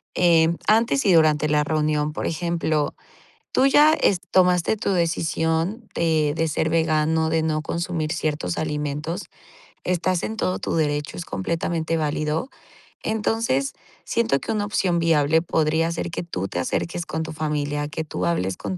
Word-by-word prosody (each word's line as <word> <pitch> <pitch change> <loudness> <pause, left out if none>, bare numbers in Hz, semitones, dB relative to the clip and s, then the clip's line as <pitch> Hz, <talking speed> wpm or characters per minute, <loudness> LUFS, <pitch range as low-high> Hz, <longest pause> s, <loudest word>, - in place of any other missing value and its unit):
Eh, 165 -2 +4 0.2
antes 230 +4 +3
y 190 - +5
durante 155 -2 +4
la 150 0 +2
reunión. 150 0 0
Por - - -4
ejemplo, 165 -3 -1 0.6
tú 260 - +3
ya, 295 +3 +6
este, 190 - +1
tomaste 180 +2 +3
tu 200 - -1
decisión, 165 +4 -1
de 160 -3 +1
de 165 0 0
ser 160 +1 0
vegano, 160 0 +1
de 160 0 +1
no 155 -1 0
consumir 170 -1 -2
ciertos 150 - -2
alimentos, 150 +3 -3 0.6
estás 180 0 0
en 220 - -3
todo 185 -3 -1
tu - - -3
derecho, 150 -2 -1
es 175 - -5
completamente 165 - -2
válido. 155 - -1 0.5
Entonces, 215 - 0 0.3
siento 230 -12 +1
que - - -3
una 210 -1 0
opción 185 -4 0
viable 160 -1 +3
podría 160 0 +1
ser 170 +1 -3
que 170 - -4
tú 95 - -4
te 90 - -4
acerques 170 - -2
con 160 0 -3
tu 160 - -6
familia, 145 -1 -2
que 160 +1 -4
tú 90 - -3
hables 90 +2 0
con 95 -3 -4
160 Hz, 160 wpm, -23 LUFS, 150-175 Hz, 0.6 s, ya